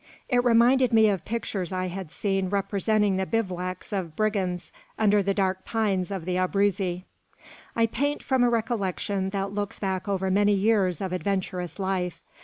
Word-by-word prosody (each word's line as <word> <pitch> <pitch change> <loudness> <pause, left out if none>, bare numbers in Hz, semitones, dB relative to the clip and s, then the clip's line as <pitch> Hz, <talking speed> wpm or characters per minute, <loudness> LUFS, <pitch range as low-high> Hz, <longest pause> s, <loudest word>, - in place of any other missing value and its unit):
It 245 -1 +3
reminded 245 +2 +4
me 220 -1 +6
of 190 -5 -2
pictures 205 -5 -3
I 185 0 -1
had 185 -2 -6
seen 195 -1 -1
representing 200 0 +1
the 190 0 -1
bivouacs 185 -4 -3
of 175 -6 -3
brigands 185 -6 -1 0.3
under 210 -1 +4
the 195 0 0
dark 190 -1 0
pines 205 -5 0
of 190 -5 -4
the 180 0 -1
Abruzzi. 185 -1 0 0.7
I 230 - +4
paint 285 +6 -1
from 260 -2 +2
a 245 - +4
recollection 200 -4 -1
that 195 0 -3
looks 205 -1 -3
back 190 -1 -2
over 190 -1 0
many 205 +2 +4
years 195 -4 +2
of 190 -2 -2
adventurous 185 -2 -2
life. 190 -3 -2
195 Hz, 165 wpm, -26 LUFS, 185-215 Hz, 0.7 s, me